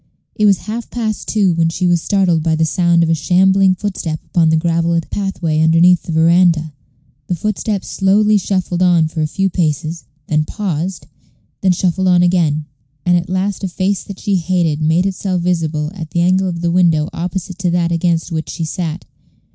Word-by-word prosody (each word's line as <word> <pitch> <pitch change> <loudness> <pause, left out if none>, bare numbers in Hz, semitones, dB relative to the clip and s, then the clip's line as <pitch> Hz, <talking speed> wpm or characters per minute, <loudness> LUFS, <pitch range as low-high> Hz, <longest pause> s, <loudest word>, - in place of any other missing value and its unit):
It 210 - +2
was 195 -3 +3
half 225 +3 -5
past 220 -3 -4
two 200 -5 +2
when 165 0 +1
she 175 +2 -2
was 175 -1 +2
startled 180 -3 +1
by 160 0 +1
the 160 0 +1
sound 170 +1 +2
of 165 - 0
a - - +3
shambling 185 +4 +3
footstep 180 -6 -4
upon 165 -2 +2
the 160 - +3
gravelled 170 0 0
pathway 170 -6 -2
underneath 165 +2 +4
the - - -7
veranda. 165 -1 +3 0.5
The 180 - -1
footstep 210 +2 -3
slowly 205 +2 +2
shuffled 185 -2 -2
on 170 -3 +3
for 160 0 -4
a 155 - +1
few 195 +5 -1
paces, 165 -2 -2 0.2
then 155 +1 +1
paused, 185 -2 -4 0.6
then 185 -2 +3
shuffled 185 +1 0
on 180 -1 +4
again; 165 -4 +1 0.4
and 175 - +3
at 175 0 -1
last 190 +2 -2
a - - 0
face 190 +2 -1
that 200 - -9
she 200 -3 0
hated 170 -3 0
made 160 +4 +2
itself 185 -2 -2
visible 160 -4 -1
at 165 -5 -7
the 170 - -1
angle 185 +2 +2
of 170 -1 -5
the 170 -1 0
window 170 -4 +2
opposite 180 +1 -5
to 185 -2 0
that 170 0 0
against 170 0 0
which 160 -1 -3
she 165 - -4
sat. 165 0 -4
175 Hz, 190 wpm, -16 LUFS, 165-190 Hz, 0.6 s, underneath